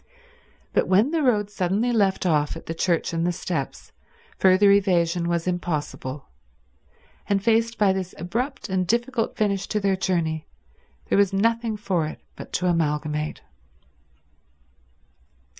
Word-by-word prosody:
But -, -, +2 dB
when 205 Hz, +9 st, +3 dB
the 330 Hz, -1 st, +1 dB
road 210 Hz, -7 st, +1 dB
suddenly 205 Hz, +5 st, 0 dB
left 200 Hz, -5 st, +1 dB
off 150 Hz, -4 st, +1 dB
at -, -, -12 dB
the 165 Hz, -, -4 dB
church 170 Hz, 0 st, 0 dB
and 165 Hz, 0 st, 0 dB
the 175 Hz, -, +1 dB
steps, -, -, -4 dB, 0.5 s
further 190 Hz, +2 st, +5 dB
evasion 175 Hz, -3 st, +2 dB
was 170 Hz, -1 st, 0 dB
impossible; 150 Hz, -6 st, -3 dB, 1.0 s
and 200 Hz, -1 st, +3 dB
faced 230 Hz, +1 st, +2 dB
by 200 Hz, -2 st, +4 dB
this 185 Hz, -1 st, -4 dB
abrupt 240 Hz, -, -3 dB
and 185 Hz, -2 st, -1 dB
difficult 235 Hz, +1 st, 0 dB
finish 200 Hz, -2 st, 0 dB
to 215 Hz, -, -1 dB
their 200 Hz, -1 st, +1 dB
journey 170 Hz, -4 st, -1 dB, 0.6 s
there -, -, +3 dB
was 200 Hz, -1 st, +3 dB
nothing 230 Hz, +2 st, +1 dB
for 180 Hz, -6 st, -1 dB
it 155 Hz, -, -8 dB, 0.2 s
but -, -, -10 dB
to 180 Hz, -, -1 dB
amalgamate. 150 Hz, -3 st, -1 dB
190 Hz, 140 wpm, -24 LUFS, 170-210 Hz, 1.0 s, further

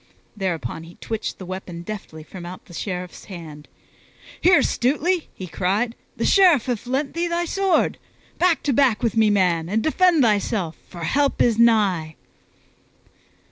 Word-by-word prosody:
Thereupon 170 Hz, -, -3 dB
he 165 Hz, +2 st, -13 dB
twitched 225 Hz, -1 st, -5 dB
the 185 Hz, -, -9 dB
weapon 180 Hz, -2 st, -7 dB
deftly 175 Hz, -6 st, -8 dB
from 180 Hz, +3 st, -10 dB
out 175 Hz, +1 st, -9 dB
the 175 Hz, -, -15 dB
Sheriff's 180 Hz, 0 st, -5 dB
hand, 160 Hz, -6 st, -10 dB, 0.7 s
"Here, 360 Hz, 0 st, +5 dB
Stutely," 310 Hz, +7 st, 0 dB
he 185 Hz, -, -7 dB
cried, 200 Hz, +7 st, -1 dB, 0.2 s
"the -, -, -1 dB
Sheriff 355 Hz, -, +5 dB
hath 245 Hz, -2 st, -3 dB
lent 270 Hz, +3 st, -1 dB
thee 340 Hz, +1 st, -1 dB
his 340 Hz, 0 st, -1 dB
sword! 390 Hz, -1 st, +1 dB, 0.4 s
Back 350 Hz, -2 st, +2 dB
to 280 Hz, -, +1 dB
back 245 Hz, -4 st, +2 dB
with 230 Hz, -3 st, 0 dB
me, 220 Hz, -1 st, +4 dB
man, 175 Hz, -5 st, +1 dB
and 220 Hz, +3 st, 0 dB
defend 335 Hz, -1 st, +3 dB
thyself, 205 Hz, -6 st, 0 dB
for 175 Hz, -2 st, -8 dB
help 280 Hz, -, +1 dB
is 230 Hz, -2 st, +3 dB
nigh!" 195 Hz, -9 st, +3 dB
215 Hz, 155 wpm, -22 LUFS, 180-280 Hz, 0.7 s, Here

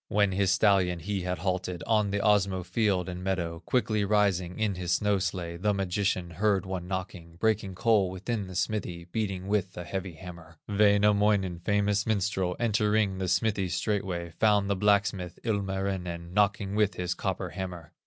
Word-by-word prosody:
When 105 Hz, -1 st, +2 dB
his 95 Hz, 0 st, +1 dB
stallion 95 Hz, -4 st, +3 dB
he 95 Hz, +3 st, -3 dB
had 90 Hz, 0 st, -2 dB
halted 90 Hz, -1 st, -2 dB
On 105 Hz, -3 st, +2 dB
the 100 Hz, -, -1 dB
Osmo 100 Hz, -3 st, +2 dB
field 95 Hz, -4 st, +1 dB
and 90 Hz, 0 st, -6 dB
meadow, 85 Hz, -3 st, -2 dB
Quickly 110 Hz, -4 st, +1 dB
rising 100 Hz, -4 st, +1 dB
in 110 Hz, -2 st, 0 dB
his 90 Hz, -1 st, -2 dB
snow 105 Hz, +2 st, +2 dB
sledge, 85 Hz, -2 st, -3 dB
The 105 Hz, 0 st, +2 dB
magician 95 Hz, -2 st, -1 dB
heard 100 Hz, +2 st, +1 dB
one 95 Hz, -2 st, -4 dB
knocking, 90 Hz, -3 st, -5 dB
Breaking 105 Hz, 0 st, 0 dB
coal 105 Hz, -1 st, +3 dB
within 100 Hz, +2 st, -3 dB
the 95 Hz, -, -9 dB
smithy, 90 Hz, -5 st, -2 dB
Beating 95 Hz, 0 st, -3 dB
with 100 Hz, -2 st, -1 dB
a 90 Hz, -, -4 dB
heavy 95 Hz, +1 st, -4 dB
hammer. 85 Hz, -1 st, -11 dB
Wainamoinen, 100 Hz, -2 st, +3 dB
famous 105 Hz, +2 st, +1 dB
minstrel, 95 Hz, -4 st, 0 dB
Entering 105 Hz, -3 st, +1 dB
the 95 Hz, -, -1 dB
smithy 95 Hz, 0 st, +1 dB
straightway, 90 Hz, -1 st, -2 dB
Found 105 Hz, -2 st, +3 dB
the -, -, +2 dB
blacksmith, 100 Hz, -3 st, +1 dB
Ilmarinen, 95 Hz, -5 st, -2 dB
Knocking 100 Hz, -1 st, +1 dB
with 105 Hz, -1 st, +2 dB
his 90 Hz, -1 st, -2 dB
copper -, -, -3 dB
hammer. 90 Hz, -4 st, -7 dB
95 Hz, 165 wpm, -28 LUFS, 90-105 Hz, -, stallion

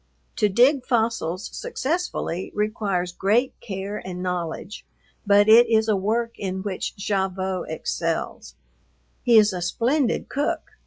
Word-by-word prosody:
To 210 Hz, -, +3 dB
dig 250 Hz, +6 st, +4 dB
fossils 220 Hz, -8 st, -1 dB
successfully 335 Hz, -, -3 dB
requires 205 Hz, -4 st, -1 dB
great 220 Hz, +8 st, +1 dB
care 200 Hz, -2 st, -5 dB
and 180 Hz, -1 st, -6 dB
knowledge, 180 Hz, +2 st, -4 dB, 0.4 s
but 205 Hz, +1 st, +5 dB
it 230 Hz, +2 st, +7 dB
is 220 Hz, -1 st, +3 dB
a 215 Hz, -, +3 dB
work 230 Hz, +4 st, -1 dB
in 190 Hz, -1 st, -3 dB
which 195 Hz, -3 st, -4 dB
Gavotte 190 Hz, -2 st, -2 dB
excels. 155 Hz, -, -3 dB, 0.7 s
He 235 Hz, -2 st, +5 dB
is 215 Hz, -2 st, +5 dB
a 180 Hz, -, -4 dB
splendid 240 Hz, -, 0 dB
cook. 285 Hz, +2 st, -2 dB
205 Hz, 125 wpm, -24 LUFS, 185-235 Hz, 0.7 s, it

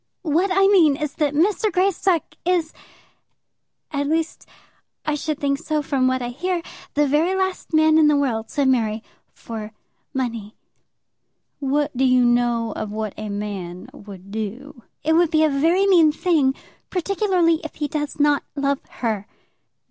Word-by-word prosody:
"What 340 Hz, +4 st, +1 dB
I 390 Hz, +1 st, +4 dB
mean 350 Hz, -8 st, +5 dB
is 300 Hz, 0 st, -4 dB
that 295 Hz, -2 st, 0 dB
Mr. 410 Hz, +6 st, +2 dB
Greystock 370 Hz, -1 st, +2 dB, 0.2 s
is, 340 Hz, -3 st, 0 dB, 1.2 s
at 285 Hz, -1 st, -1 dB
least, 320 Hz, +1 st, -2 dB, 0.6 s
I 305 Hz, -, 0 dB
should 300 Hz, 0 st, -2 dB
think 280 Hz, -1 st, 0 dB
so 310 Hz, -2 st, -2 dB
from 265 Hz, -2 st, +1 dB
what 255 Hz, -1 st, 0 dB
I 240 Hz, -, -3 dB
hear, 345 Hz, +7 st, -2 dB, 0.3 s
the 295 Hz, 0 st, +3 dB
very 310 Hz, +7 st, +2 dB
last 380 Hz, -1 st, -2 dB
man 315 Hz, 0 st, +4 dB
in 310 Hz, -, +5 dB
the 300 Hz, -, +4 dB
world 230 Hz, -6 st, -1 dB
to 285 Hz, +4 st, -1 dB
marry 225 Hz, -4 st, +1 dB, 0.3 s
for 220 Hz, -1 st, -8 dB, 0.4 s
money." 230 Hz, -5 st, -4 dB, 1.0 s
"What 285 Hz, 0 st, 0 dB
do 260 Hz, -, +1 dB
you 255 Hz, -1 st, +4 dB
know 240 Hz, -1 st, +1 dB
of 215 Hz, -, -4 dB
what 215 Hz, -1 st, -4 dB
a 215 Hz, 0 st, -6 dB
man 200 Hz, -4 st, -6 dB
would 195 Hz, -2 st, -12 dB
do?" 225 Hz, +5 st, -6 dB, 0.2 s
"It 320 Hz, +2 st, +2 dB
would 340 Hz, 0 st, +4 dB
be 315 Hz, -1 st, +3 dB
a 310 Hz, -, +4 dB
very 330 Hz, +8 st, +2 dB
mean 340 Hz, -6 st, +5 dB
thing; 300 Hz, -4 st, +1 dB, 0.3 s
particularly 365 Hz, -3 st, +1 dB
if 315 Hz, -, -7 dB
he 295 Hz, -, -2 dB
does 295 Hz, 0 st, -4 dB
not 290 Hz, -1 st, +3 dB
love 280 Hz, -1 st, 0 dB, 0.2 s
her." 215 Hz, -3 st, -1 dB
290 Hz, 160 wpm, -22 LUFS, 240-330 Hz, 1.2 s, mean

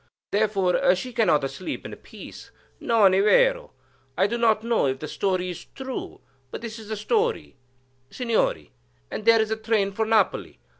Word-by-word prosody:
Therefore 195 Hz, -3 st, +2 dB
she 250 Hz, +7 st, -6 dB
cannot 155 Hz, -, +2 dB
sleep 185 Hz, -, -6 dB
in -, -, -7 dB
peace,—non 220 Hz, -5 st, -2 dB
è 190 Hz, -, +3 dB
vero? -, -, +3 dB, 0.5 s
I -, -, +3 dB
do 230 Hz, -, -1 dB
not 225 Hz, -2 st, +2 dB
know 230 Hz, -10 st, +1 dB
if 130 Hz, 0 st, -1 dB
the 155 Hz, -, -7 dB
story 185 Hz, +2 st, -1 dB
is 175 Hz, -1 st, -9 dB
true, 265 Hz, -1 st, -6 dB, 0.3 s
but -, -, -7 dB
this 230 Hz, -1 st, -7 dB
is 220 Hz, -, -11 dB
the 220 Hz, -, -3 dB
story, 445 Hz, -, -1 dB, 0.5 s
Signori, 225 Hz, -, -1 dB, 0.4 s
and 215 Hz, -, -5 dB
there 230 Hz, 0 st, +6 dB
is 220 Hz, -1 st, +1 dB
the 220 Hz, -, -1 dB
train 220 Hz, -3 st, 0 dB
for 220 Hz, +2 st, -2 dB
Napoli. 220 Hz, -3 st, +1 dB
220 Hz, 165 wpm, -24 LUFS, 190-230 Hz, 0.5 s, there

